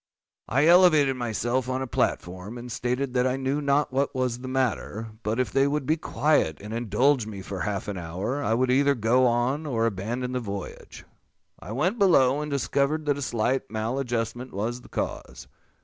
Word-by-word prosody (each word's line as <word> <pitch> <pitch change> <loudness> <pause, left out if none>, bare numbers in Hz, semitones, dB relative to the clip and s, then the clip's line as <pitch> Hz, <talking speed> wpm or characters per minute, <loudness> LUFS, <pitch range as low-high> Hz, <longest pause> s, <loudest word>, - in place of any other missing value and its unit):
I 135 +4 +3
elevated 160 -6 +6
myself 120 +1 -1
on 130 +1 -1
a - - -3
platform, 95 -2 -2
and 120 0 -8
stated 125 +3 -2
that 125 0 +2
I 130 +1 0
knew 135 +2 -1
not 140 -1 +1
what 140 +1 0
was 125 -2 -1
the 130 - -7
matter; 120 -4 -2
but 110 +2 -2
if 130 - 0
they 135 +1 +3
would 145 -1 -1
be 155 - +2
quiet, 150 - +1
and 105 +2 -8
indulge 120 +2 +1
me 100 -3 -7
for 95 0 -6
half 100 -1 -3
an 100 -2 -4
hour, 95 - -3
I 110 - +1
would 125 +1 +1
either 140 +2 +3
go 120 +2 +3
on 125 +6 0
or 115 -5 0
abandon 115 +5 -2
the 125 - -1
voyage. 100 -4 -7 0.5
I - - -9
went 180 - 0
below, 145 -8 +4
and 150 - -4
discovered 140 +2 0
that 145 -1 +1
a - - -5
slight 130 +1 -1
maladjustment 120 +1 -3
was 115 +5 -3
the - - -16
cause. - - -5
125 Hz, 190 wpm, -26 LUFS, 115-140 Hz, 0.5 s, elevated